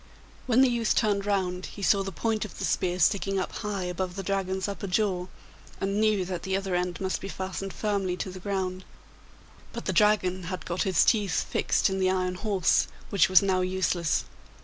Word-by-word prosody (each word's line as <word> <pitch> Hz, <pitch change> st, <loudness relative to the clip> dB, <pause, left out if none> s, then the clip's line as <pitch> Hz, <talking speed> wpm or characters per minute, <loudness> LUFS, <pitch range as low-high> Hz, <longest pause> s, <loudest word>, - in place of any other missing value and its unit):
When 250 Hz, +1 st, +4 dB
the 265 Hz, -, +6 dB
youth 235 Hz, -2 st, +1 dB
turned 205 Hz, -2 st, +1 dB
round 185 Hz, -2 st, -1 dB
he 200 Hz, -, -9 dB
saw 200 Hz, +1 st, +4 dB
the 195 Hz, 0 st, -4 dB
point 220 Hz, +4 st, -1 dB
of 215 Hz, -, -8 dB
the -, -, -2 dB
spear 180 Hz, -1 st, 0 dB
sticking 195 Hz, +2 st, +2 dB
up 185 Hz, -, -2 dB
high 205 Hz, -3 st, -3 dB
above 180 Hz, 0 st, -3 dB
the 195 Hz, -, -4 dB
Dragon's 190 Hz, 0 st, -1 dB
upper 200 Hz, 0 st, -5 dB
jaw, 185 Hz, -2 st, 0 dB, 0.5 s
and 195 Hz, +2 st, 0 dB
knew 215 Hz, -4 st, +2 dB
that 180 Hz, -2 st, -4 dB
the 190 Hz, 0 st, -1 dB
other 195 Hz, -1 st, -3 dB
end 180 Hz, 0 st, -1 dB
must 190 Hz, -1 st, -2 dB
be -, -, -5 dB
fastened 190 Hz, +1 st, -5 dB
firmly 195 Hz, -4 st, -1 dB
to 185 Hz, -, -4 dB
the 185 Hz, -, -9 dB
ground; 185 Hz, -1 st, -3 dB, 0.9 s
but -, -, -6 dB
the -, -, 0 dB
Dragon 190 Hz, -4 st, +2 dB
had 185 Hz, +1 st, -5 dB
got 175 Hz, +1 st, -2 dB
his 180 Hz, -, +4 dB
teeth 205 Hz, -6 st, +2 dB
fixed -, -, +1 dB
in 190 Hz, 0 st, -1 dB
the 185 Hz, -1 st, +3 dB
iron 185 Hz, -1 st, 0 dB
horse, 190 Hz, -1 st, +2 dB, 0.2 s
which 195 Hz, -3 st, +4 dB
was 185 Hz, +1 st, +6 dB
now 190 Hz, -2 st, +2 dB
useless. 185 Hz, -3 st, 0 dB
190 Hz, 200 wpm, -27 LUFS, 185-200 Hz, 0.9 s, the